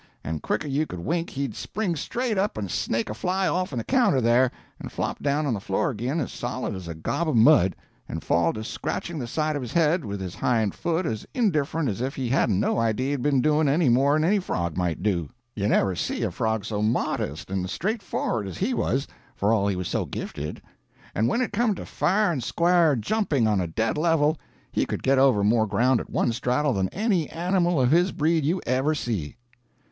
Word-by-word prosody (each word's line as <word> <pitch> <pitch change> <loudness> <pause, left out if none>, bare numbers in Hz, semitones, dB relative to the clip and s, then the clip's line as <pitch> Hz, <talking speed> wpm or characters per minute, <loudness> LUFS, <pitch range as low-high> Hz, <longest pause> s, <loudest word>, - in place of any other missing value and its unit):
and 80 0 -4
quicker'n 145 - -2
you 150 +3 0
could 90 - -7
wink 170 - -1
he'd 135 -4 -3
spring 200 -6 -2
straight 235 - -2
up 195 - 0
and 100 -4 -3
snake 115 0 -1
a - - -4
fly 185 - 0
off'n 180 -7 -1
the 115 - -1
counter 245 - +3
there, 120 +2 +4 0.3
and - - -7
flop - - -3
down 145 +2 +1
on 135 - 0
the 105 - -2
floor 95 +7 -1
ag'in 125 +7 -2
as 140 - -3
solid 125 -1 -4
as 95 -3 -7
a 85 - -5
gob 155 - -2
of 155 - 0
mud, 110 - +5 0.3
and - - -5
fall 85 -1 +2
to 110 - -6
scratching 165 +7 -4
the 120 - -4
side 155 +4 -1
of 145 - -2
his 125 -2 -6
head 165 0 +3
with 100 -3 -5
his 90 -2 -5
hind 110 -2 +1
foot 170 +1 -1
as 110 -5 -3
indifferent 165 - +1
as 110 0 -2
if 135 +2 -2
he 130 -3 -2
hadn't 115 -6 +2
no 110 - +1
idea 115 +4 0
he'd 140 -3 -1
been 140 -1 +2
doin' 155 -1 +3
any 150 0 +3
more'n 140 +5 +3
any 200 +5 +3
frog 85 - -2
might 90 -2 -1
do. 85 -8 0 0.3
You 100 -1 -1
never 95 -3 +2
see - - -2
a - - 0
frog 110 -2 -1
so 105 -1 -2
modest 105 - -1
and 95 -1 -1
straightfor'ard 180 - -2
as 95 - -7
he 225 +7 0
was, 135 - 0 0.3
for 105 +3 +2
all 100 -3 +2
he 100 - 0
was 90 -1 -3
so - - -1
gifted. 75 +1 -6 0.5
And 110 +3 +1
when 235 - +1
it 245 - -2
come 220 -1 +2
to - - -7
fair 205 0 +1
and 135 -7 -2
square 170 0 +3
jumping 140 - 0
on 105 -3 +2
a 90 - -2
dead 110 - -1
level, 155 -2 +2 0.3
he - - 0
could - - -4
get 135 0 +3
over 130 -7 +4
more 110 +1 +3
ground 120 +5 +2
at - - -7
one - - +1
straddle 125 +4 0
than 95 -2 0
any 195 -6 0
animal 175 0 +1
of 125 0 +3
his 175 +3 +4
breed 160 +1 +1
you 170 +6 +1
ever 130 +5 +1
see. 105 - -3
130 Hz, 220 wpm, -25 LUFS, 105-165 Hz, 0.5 s, mud